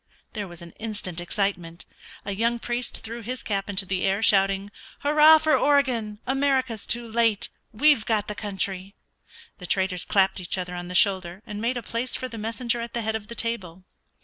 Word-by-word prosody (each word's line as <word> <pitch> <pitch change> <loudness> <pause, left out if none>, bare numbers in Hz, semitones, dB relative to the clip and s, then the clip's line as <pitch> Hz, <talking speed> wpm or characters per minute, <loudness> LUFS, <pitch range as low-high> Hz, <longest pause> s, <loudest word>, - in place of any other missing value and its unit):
There 205 -3 -4
was 175 -1 -11
instant 185 -1 -5
excitement. 175 -2 -2 0.4
A 200 - -3
young 230 +4 +1
priest 240 +1 -3
threw 230 +1 -6
his 250 +3 -5
cap 200 -1 -2
in 200 - -4
the 190 -1 +2
air, 195 +3 +1
shouting, 195 0 +3 0.3
"Hurrah 300 +2 +7
for 310 0 +3
Oregon 255 -7 +2
America's 260 -4 0
too 235 0 0
late; 225 -2 +1 0.2
we've 280 +1 +4
got 215 -3 +1
the 210 - -3
country!" 195 -2 -4 0.6
The 180 - -6
traders 190 -1 +1
clapped 195 -1 +2
each 180 +1 -3
other 180 -1 -4
on 175 0 -5
the 180 - -6
shoulder, 185 0 +2
and 210 0 -6
made 240 +2 0
a 240 - -5
place 235 +3 -2
for 255 - -3
the 230 -3 -8
messenger 235 +2 -1
at 235 +1 -6
the 235 - -1
head 220 0 -1
of 215 -2 -5
the 235 - -7
table. 190 -7 -3
210 Hz, 190 wpm, -25 LUFS, 190-235 Hz, 0.6 s, Hurrah